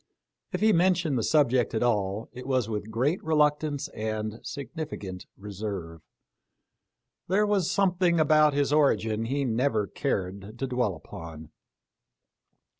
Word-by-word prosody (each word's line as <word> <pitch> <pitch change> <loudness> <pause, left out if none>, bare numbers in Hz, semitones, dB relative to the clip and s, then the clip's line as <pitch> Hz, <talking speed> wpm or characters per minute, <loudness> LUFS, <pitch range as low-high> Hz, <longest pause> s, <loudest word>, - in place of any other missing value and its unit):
If - - -3
he 220 0 +5
mentioned 175 -4 +2
the 120 - +1
subject 130 -5 +2
at 110 - +1
all, 105 -3 0
it 125 +1 -8
was 130 -4 +1
with 105 -1 -4
great 130 - 0
re 160 0 0
luctance 150 -1 +1
and 110 0 -3
significant 135 - -6
reserve. 95 -5 -6 1.3
There 200 +4 +3
was 200 -4 +1
some 190 -1 +2
thing 175 -2 +3
about 155 -1 +4
his 145 0 +1
origin 115 -7 +2
he 140 +4 -1
never 115 -2 +1
cared 100 -3 -3
to 135 - -2
dwell 125 -7 0
upon. 80 0 -10
125 Hz, 135 wpm, -27 LUFS, 105-155 Hz, 1.3 s, he